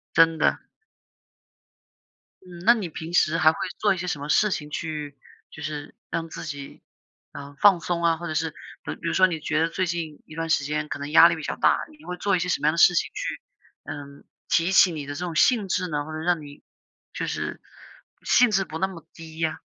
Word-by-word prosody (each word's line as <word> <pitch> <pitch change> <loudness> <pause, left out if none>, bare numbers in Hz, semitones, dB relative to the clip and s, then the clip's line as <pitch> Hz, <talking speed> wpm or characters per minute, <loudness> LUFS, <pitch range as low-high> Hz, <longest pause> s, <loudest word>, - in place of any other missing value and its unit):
真 165 -1 +5
的。 - - +2 1.9
嗯， 175 -1 -11
那 235 - +8
你 210 -7 -3
平 160 +1 -8
时 165 -2 +3
还 155 -2 +6
会 - - -10 0.2
做 210 -2 +3
一 - - -7
些 180 - -4
什 160 -5 -3
么 145 - -6
事 210 +8 +3
情 150 -5 -4
去 150 -3 -5 0.3
就 155 - -11
是 150 0 -6 0.2
让 165 0 -3
自 - - -7
己， 140 -2 -8 0.5
呃， 140 0 -9
放 195 -4 +6
松 170 0 -2
啊， 165 -1 +3
或 175 +2 -7
者 155 - -3
是， 160 0 -1 0.3
不 - - -4
比 - - -19
如 - - 0
说 185 - +5
你 165 -4 -4
觉 155 +1 0
得 165 - +2
最 185 +2 -1
近 165 -3 -4
一 155 - -12
段 165 0 -3
时 150 -3 +2
间 150 +1 -2
可 145 - -4
能 145 +1 -5
压 155 - +8
力 - - 0
比 - - -8
较 - - -4
大， - - +3
你 305 0 -18
会 180 - -5
做 200 +1 +1
一 - - 0
些 180 - -2
什 - - 0
么 150 - +2
样 - - +3
的 170 - -5
事 180 - +7
情 - - 0
去， - - -4 0.4
呃， - - -6 0.5
提 170 +2 +2
起 185 -2 +6
你 150 -3 -5
的 145 +1 -6
这 175 +5 -4
种 170 -2 -4
兴 220 +5 +3
致 185 0 -1
呢， 145 -3 -2
或 155 - -8
者 155 - -5
让 170 +1 0
你 145 -1 -12 0.5
就 - - -3
是 - - -4 0.6
兴 250 -2 +4
致 195 -1 +2
不 160 -3 -7
那 190 - +1
么 180 -4 -11
低 160 -1 -11
呀？ 160 -1 -1
165 Hz, 255 characters per minute, -25 LUFS, 150-180 Hz, 1.9 s, 那